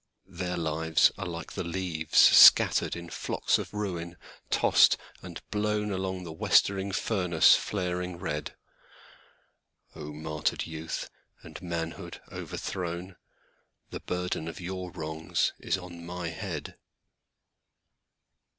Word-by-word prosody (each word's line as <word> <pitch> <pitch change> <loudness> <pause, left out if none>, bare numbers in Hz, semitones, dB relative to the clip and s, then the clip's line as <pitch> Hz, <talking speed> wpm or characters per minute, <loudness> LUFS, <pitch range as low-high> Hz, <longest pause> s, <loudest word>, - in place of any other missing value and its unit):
Their 90 0 -3
lives 80 0 +2
are 95 - -4
like 85 -1 -6
the - - -3
leavesScattered 85 -3 +5
in 85 -1 -8
flocks - - 0
of - - -6
ruin, 90 -5 -4 0.3
tossed - - +5 0.2
and - - -8
blownAlong 105 -3 -1
the 85 -2 -7
westering 95 +4 +2
furnace 90 -5 +4
flaring 90 -2 -3
red.O 75 -1 -10
martyred 75 0 -2
youth 80 0 -5 0.4
and - - -10
manhood 85 -2 -5
overthrown, 90 +1 -5 0.8
The - - -5
burden 90 -2 -3
of 85 - -7
your 90 0 -5
wrongs 80 -2 -2
is - - -1
on 90 -2 -10
my 90 0 -5
head. 80 - -6
90 Hz, 105 wpm, -28 LUFS, 80-95 Hz, 0.8 s, leavesScattered